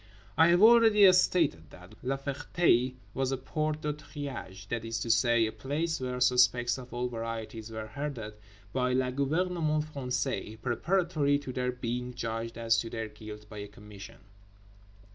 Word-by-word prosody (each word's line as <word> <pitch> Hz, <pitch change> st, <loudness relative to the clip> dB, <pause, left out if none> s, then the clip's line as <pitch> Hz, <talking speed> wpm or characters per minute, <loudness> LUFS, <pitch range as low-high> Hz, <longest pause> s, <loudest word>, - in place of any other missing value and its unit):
I 160 Hz, -, +6 dB
have 175 Hz, +3 st, +4 dB
already 220 Hz, -4 st, +7 dB
stated 165 Hz, -, +2 dB
that 90 Hz, 0 st, -14 dB
La 135 Hz, +2 st, -1 dB
Ferté 135 Hz, -2 st, +1 dB, 0.2 s
was 135 Hz, 0 st, -1 dB
a 135 Hz, -, 0 dB
Porte 155 Hz, +3 st, -2 dB
de 150 Hz, 0 st, -1 dB
Triage—that 125 Hz, -8 st, -6 dB
is 115 Hz, 0 st, -3 dB
to 115 Hz, -, +1 dB
say, 120 Hz, -2 st, +3 dB
a 110 Hz, -, -2 dB
place 155 Hz, +7 st, -2 dB
where 125 Hz, -1 st, -3 dB
suspects 125 Hz, 0 st, +3 dB
of 125 Hz, -1 st, -11 dB
all 120 Hz, +1 st, -2 dB
varieties 115 Hz, -1 st, -5 dB
were 110 Hz, -1 st, -6 dB
herded 115 Hz, -2 st, -5 dB, 0.4 s
by 125 Hz, -1 st, +1 dB
le 130 Hz, 0 st, +1 dB
gouvernement 155 Hz, +2 st, 0 dB
français 125 Hz, -4 st, -3 dB
preparatory 155 Hz, +2 st, +1 dB
to 145 Hz, -3 st, -7 dB
their 125 Hz, 0 st, -1 dB
being 125 Hz, 0 st, -4 dB
judged 115 Hz, -1 st, -4 dB
as 115 Hz, -1 st, +2 dB
to 115 Hz, -, -4 dB
their 115 Hz, -2 st, -4 dB
guilt 105 Hz, -1 st, -10 dB
by 105 Hz, -1 st, -9 dB
a 100 Hz, -, -6 dB
Commission. 105 Hz, 0 st, -12 dB
125 Hz, 160 wpm, -30 LUFS, 115-145 Hz, 0.4 s, already